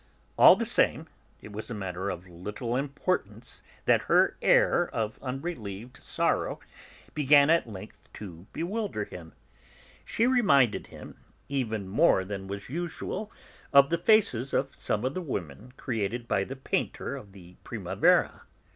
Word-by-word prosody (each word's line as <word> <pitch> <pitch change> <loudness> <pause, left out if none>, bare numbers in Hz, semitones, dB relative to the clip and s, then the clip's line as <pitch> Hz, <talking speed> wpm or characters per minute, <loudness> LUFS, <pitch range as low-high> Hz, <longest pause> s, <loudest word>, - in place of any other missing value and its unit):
All - - +9
the - - -2
same, - - +1 0.4
it 105 - -10
was 110 +2 -7
a 120 - -4
matter 95 -1 -4
of 90 -2 -5
so 90 - -17
little 105 +7 -5
importance 135 - -3 0.2
that - - +3
her - - +3
air - - +4
of 110 -1 -3
unrelieved 125 - -6
sorrow - - -1 0.5
began 145 0 +5
at 165 -8 +2
length 105 0 -11
to 90 -3 -10
bewilder 190 - -3
him. 85 -4 -11 0.7
She 230 - 0
reminded 155 - +3
him, - - -12 0.3
even 110 -8 -2
more 100 - +3
than 95 -1 -6
was 100 +1 -6
usual, 175 - -5 0.4
of 140 +1 +6
the 170 - +1
faces 175 - +2
of 135 0 0
some 105 +3 -2
of 130 - -1
the 185 - -3
women 105 - -6
created 115 0 -3
by 95 -3 +1
the 135 - -7
painter 135 - -3
of 100 - -10
the 90 -2 -15
Primavera.' - - +1
120 Hz, 145 wpm, -28 LUFS, 100-145 Hz, 0.7 s, All